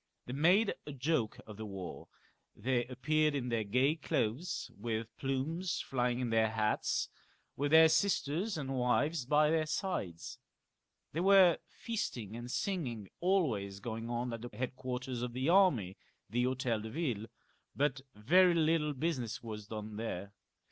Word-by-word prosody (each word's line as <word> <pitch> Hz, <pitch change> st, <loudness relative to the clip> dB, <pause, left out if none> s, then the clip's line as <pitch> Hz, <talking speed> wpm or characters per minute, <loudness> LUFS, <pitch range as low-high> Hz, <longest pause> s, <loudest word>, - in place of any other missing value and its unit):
They 125 Hz, -, -6 dB
made 180 Hz, +10 st, +4 dB
a 145 Hz, -, -5 dB
joke 135 Hz, -4 st, 0 dB
of 110 Hz, -2 st, -10 dB
the 110 Hz, -, -5 dB
war; 95 Hz, -3 st, -7 dB, 0.5 s
they 125 Hz, -1 st, 0 dB
appeared 150 Hz, +4 st, +1 dB
in 125 Hz, -3 st, -2 dB
their 115 Hz, -2 st, 0 dB
gay 125 Hz, +9 st, +2 dB
clothes 145 Hz, +1 st, -2 dB
with 110 Hz, +1 st, -4 dB
plumes 155 Hz, +7 st, -1 dB
flying 125 Hz, -2 st, 0 dB
in 125 Hz, -2 st, -1 dB
their 110 Hz, -1 st, +3 dB
hats, 110 Hz, -1 st, 0 dB, 0.5 s
with 145 Hz, +1 st, 0 dB
their 160 Hz, +1 st, +8 dB
sisters 165 Hz, +2 st, +1 dB
and 135 Hz, -2 st, -3 dB
wives 130 Hz, +3 st, +1 dB
by 150 Hz, +2 st, +4 dB
their 160 Hz, -1 st, +1 dB
sides. 145 Hz, -, -3 dB, 0.7 s
There 165 Hz, -, -2 dB
were 190 Hz, -3 st, +6 dB
feasting 120 Hz, -, -4 dB
and 120 Hz, +1 st, -7 dB
singing 125 Hz, -, -2 dB
always 125 Hz, -, +1 dB
going 115 Hz, +2 st, -5 dB
on 120 Hz, 0 st, -2 dB
at 115 Hz, -, -5 dB
the 120 Hz, -, -6 dB
headquarters 125 Hz, 0 st, -3 dB
of 120 Hz, -1 st, -3 dB
the 130 Hz, +5 st, 0 dB
army, 145 Hz, -, +4 dB, 0.3 s
the 120 Hz, +4 st, 0 dB
Hotel 130 Hz, -3 st, 0 dB
de 110 Hz, -, -6 dB
Yille, 115 Hz, -6 st, -2 dB, 0.5 s
but 140 Hz, -1 st, +1 dB
very 175 Hz, -, +5 dB
little 155 Hz, -2 st, +2 dB
business 130 Hz, -7 st, -2 dB
was 105 Hz, -2 st, -7 dB
done 105 Hz, -1 st, -6 dB
there. 100 Hz, -3 st, -4 dB
130 Hz, 150 wpm, -33 LUFS, 115-160 Hz, 0.7 s, their